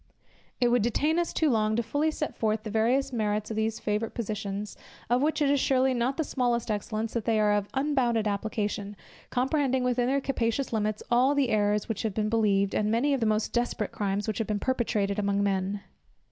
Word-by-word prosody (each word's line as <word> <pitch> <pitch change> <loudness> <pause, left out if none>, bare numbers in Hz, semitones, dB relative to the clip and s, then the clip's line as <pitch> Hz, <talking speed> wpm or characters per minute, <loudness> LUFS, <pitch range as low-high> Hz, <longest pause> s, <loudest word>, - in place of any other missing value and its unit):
It 245 - +3
would 245 -1 +3
detain 295 +9 +1
us 345 - -1
too 315 - +1
long 220 -4 +2
fully 290 +7 0
to 310 - -6
set 300 - -3
forth 215 -1 0
the 215 - -5
various 250 +5 +1
merits 215 -1 -1
of - - -3
these 220 0 -1
favourite 215 +1 -2
positions, 210 -2 -4 0.4
of 245 +1 +3
which 305 +1 +1
it 280 - +2
is 285 - +3
surely 260 0 +2
not 250 +2 0
the 320 - +1
smallest 240 -5 0
excellence, 215 +1 -3
that 230 -3 -2
they 225 -2 +2
are 210 -1 +3
of 205 -1 0
unbounded 260 -6 +1
application, 205 0 -2 0.3
comprehending 265 0 +1
within 250 -1 +1
their 275 +2 +2
capacious 255 -1 -1
limits, 215 -1 -1
all 255 +4 +4
the 275 -3 +2
errors 210 -1 +1
which 225 -3 -3
have 215 -4 -2
been 215 -1 0
believed, 200 -3 +2
and 210 0 +1
many 245 +6 +2
of 275 - +1
the 225 - +1
most 215 0 0
desperate 240 -3 -1
crimes 200 0 -2
which 215 0 -2
have 225 - -1
been 210 - 0
perpetrated 210 -4 0
among 200 0 +1
men. 195 0 -1
225 Hz, 210 wpm, -28 LUFS, 210-255 Hz, 0.4 s, all